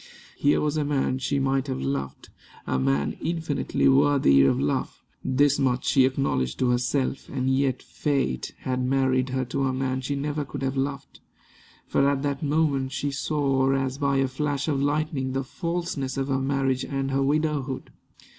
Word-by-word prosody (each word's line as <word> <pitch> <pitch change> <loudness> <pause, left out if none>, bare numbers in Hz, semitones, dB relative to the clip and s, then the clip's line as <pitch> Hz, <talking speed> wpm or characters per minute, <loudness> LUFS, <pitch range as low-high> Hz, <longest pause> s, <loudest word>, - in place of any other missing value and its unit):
Here 145 +1 +2
was 150 0 0
a 150 - +1
man 135 -2 0
she 140 +2 -1
might 135 0 0
have 130 - -3
loved 70 0 -4 0.4
a 65 - 0
man 70 +2 0
infinitely 160 -4 0
worthy 135 - +5
of 70 - +3
love 70 +1 -1 0.2
this 140 +2 +2
much 130 -2 +1
she 135 -2 +5
acknowledged 130 - 0
to 125 -1 +2
herself; 130 +2 -1
and 130 -1 -1
yet 130 -2 0
Fate 135 - -1
had 130 0 -1
married 130 0 +1
her 130 0 -1
to 135 +2 -1
a 130 - 0
man 130 0 -1
she 140 +2 -2
never 145 +1 -2
could 135 - -6
have 135 0 -1
loved. 140 +1 -3 0.7
For 140 - +2
at 140 -1 -1
that 140 -1 -2
moment 145 -3 +1
she 145 0 -2
saw 135 -2 +1
as 135 0 -1
by 140 -1 +1
a 135 0 +2
flash 140 +2 -2
of 140 -3 0
lightning 145 -2 -1
the 135 0 -1
falseness 170 -3 -3
of 135 0 -1
her 135 -1 +1
marriage 135 -1 0
and 135 -1 -2
her 135 +1 +1
widowhood. 145 -2 -1
135 Hz, 175 wpm, -25 LUFS, 130-145 Hz, 0.7 s, worthy